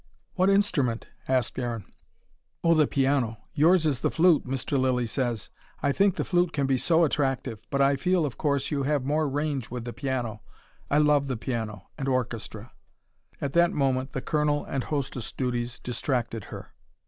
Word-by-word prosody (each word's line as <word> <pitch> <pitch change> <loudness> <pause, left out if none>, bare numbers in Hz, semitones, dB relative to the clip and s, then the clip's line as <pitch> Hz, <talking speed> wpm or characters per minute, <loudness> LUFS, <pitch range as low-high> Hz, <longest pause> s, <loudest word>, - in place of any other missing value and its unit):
"What 185 +1 +3
instrument?" 145 - +1 0.2
asked 130 -1 0
Aaron. 120 -5 -3 0.8
"Oh, 170 - +5
the 155 -3 +4
piano. 135 -5 +1 0.2
Yours 160 +2 +4
is 140 -5 +1
the - - +1
flute, 165 -4 +3
Mr. 135 +2 -2
Lilly 130 -2 +2
says. 120 -2 -2 0.3
I 140 - +3
think 195 +4 +3
the - - -2
flute 175 -1 +1
can 140 -2 0
be 135 -1 +1
so 165 +3 +3
attractive. 135 -6 0
But 140 - 0
I 140 0 +4
feel, 180 +2 +2
of 135 -6 -4
course 140 -2 0
you 145 -2 0
have 140 -1 0
more 150 +1 +1
range 145 -3 -2
with 120 -1 -5
the 120 - -5
piano. 125 -6 -3 0.5
I 145 - +3
love 150 -2 +4
the 130 -3 -2
piano 110 -5 -4
and 135 - -2
orchestra." 120 -3 -3 0.7
At 140 -1 -3
that 170 0 +4
moment, 135 -1 0
the 130 - -2
colonel 150 0 0
and 135 -2 -3
hostess 135 -5 -3
duties 120 -2 -2
distracted 120 -3 -2
her. - - -10
135 Hz, 175 wpm, -27 LUFS, 125-150 Hz, 0.8 s, Oh